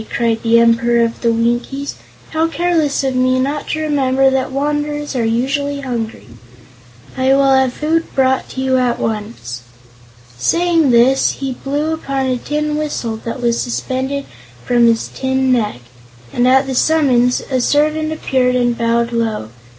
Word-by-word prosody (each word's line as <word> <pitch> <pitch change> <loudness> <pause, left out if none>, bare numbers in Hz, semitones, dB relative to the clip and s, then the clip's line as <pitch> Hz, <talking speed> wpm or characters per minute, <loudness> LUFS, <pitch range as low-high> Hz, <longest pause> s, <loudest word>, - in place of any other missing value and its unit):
cried 230 -1 0
the 230 0 +3
Emperor 235 0 +3
of 230 - -5
the 235 - +2
Winkies; 240 +5 -1 0.4
"how 320 +1 +1
careless 330 -4 0
of 265 -1 0
me 255 0 +2
not 285 +3 -2
to 310 - -2
remember 270 -3 +2
that 265 0 -1
wanderers 295 +1 -2
are 245 - 0
usually 275 +5 -1
hungry. 235 - -5 0.9
I 265 +1 +3
will 275 -1 +4
have 265 -1 +3
food 320 +5 -1
brought 265 0 0
you 260 0 +1
at 245 -1 +1
once." 205 - -4 0.8
Saying 335 - +2
this 250 +3 +4
he 270 -1 -4
blew 290 +5 -2
upon 275 -4 -2
a 255 -1 0
tin 300 +3 -2
whistle 250 -7 -3
that 230 +3 -6
was 235 -1 +1
suspended 260 +3 -3 0.4
from 240 -1 +3
his 230 -1 +1
tin 265 0 -1
neck, 210 - 0 0.5
and 245 +1 +2
at 265 +2 +4
the 270 - -4
summons 255 -4 +2
a 255 -1 +1
servant 305 +3 +1
appeared 260 -5 0
and 245 -1 +1
bowed 235 0 0
low. 225 - -2
260 Hz, 155 wpm, -17 LUFS, 235-285 Hz, 0.9 s, will